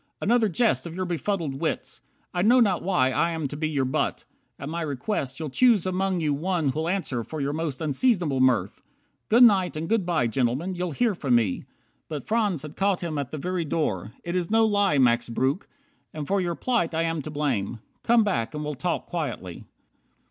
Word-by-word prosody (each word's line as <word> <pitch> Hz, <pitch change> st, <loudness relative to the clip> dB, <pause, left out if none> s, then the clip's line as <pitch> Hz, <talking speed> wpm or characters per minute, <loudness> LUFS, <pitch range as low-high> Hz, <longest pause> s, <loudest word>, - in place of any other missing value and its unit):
"Another 230 Hz, 0 st, +2 dB
jest 215 Hz, 0 st, +1 dB
Of 170 Hz, -, -8 dB
your 185 Hz, 0 st, -2 dB
befuddled 170 Hz, -5 st, -2 dB
wits. -, -, -3 dB, 0.3 s
I 175 Hz, -, 0 dB
know 240 Hz, +6 st, +5 dB
not 200 Hz, -7 st, +3 dB
why 150 Hz, -9 st, +2 dB
I 170 Hz, +6 st, +1 dB
am 160 Hz, -3 st, -2 dB
to 145 Hz, -, -6 dB
be 155 Hz, +1 st, -1 dB
your 140 Hz, -4 st, 0 dB
butt. 130 Hz, -, -1 dB, 0.3 s
At 140 Hz, -, -7 dB
my 170 Hz, +3 st, -3 dB
request 140 Hz, -1 st, -3 dB
You'll 155 Hz, -4 st, -4 dB
choose 230 Hz, -, +4 dB
among 185 Hz, -1 st, 0 dB
you 150 Hz, -2 st, +1 dB
one 165 Hz, 0 st, 0 dB
who'll 155 Hz, +5 st, -1 dB
answer 170 Hz, -11 st, -2 dB
for 155 Hz, +7 st, -7 dB
Your 140 Hz, 0 st, -1 dB
most 155 Hz, -3 st, -3 dB
unseasonable 160 Hz, -, +1 dB
mirth. 130 Hz, -3 st, +2 dB, 0.5 s
Good 235 Hz, +3 st, +7 dB
night 190 Hz, -8 st, +4 dB
And 160 Hz, +1 st, -3 dB
good 225 Hz, 0 st, +2 dB
by, 170 Hz, -7 st, +1 dB
gentlemen. 130 Hz, -, 0 dB
You'll 180 Hz, 0 st, -2 dB
hear 220 Hz, -, +1 dB
from 140 Hz, -9 st, +1 dB
me." 110 Hz, -6 st, +1 dB, 0.4 s
But 150 Hz, -4 st, -5 dB
Franz 210 Hz, -9 st, +1 dB
had 150 Hz, 0 st, -9 dB
caught 195 Hz, -1 st, +1 dB
him 160 Hz, -4 st, -3 dB
at 140 Hz, -3 st, -3 dB
the 155 Hz, -, -5 dB
very 180 Hz, +3 st, -2 dB
door, 110 Hz, -, -2 dB
"It 175 Hz, 0 st, -3 dB
is 175 Hz, -2 st, -1 dB
no 225 Hz, +1 st, +4 dB
lie, 205 Hz, -7 st, +2 dB
Max 120 Hz, -2 st, +3 dB
Breuck, 130 Hz, +8 st, -1 dB, 0.5 s
and 150 Hz, -2 st, -4 dB
for 200 Hz, 0 st, +1 dB
your 175 Hz, -1 st, -1 dB
plight 200 Hz, -10 st, 0 dB
I 165 Hz, -, +1 dB
am 165 Hz, -1 st, -1 dB
to 155 Hz, -, -7 dB
blame. 140 Hz, -8 st, -1 dB, 0.2 s
Come 235 Hz, -1 st, +4 dB
back, 155 Hz, -, -1 dB
and 150 Hz, -, -3 dB
we'll 150 Hz, -, -2 dB
talk 170 Hz, +5 st, -2 dB
quietly. 140 Hz, -, -5 dB
165 Hz, 205 wpm, -25 LUFS, 140-190 Hz, 0.5 s, Good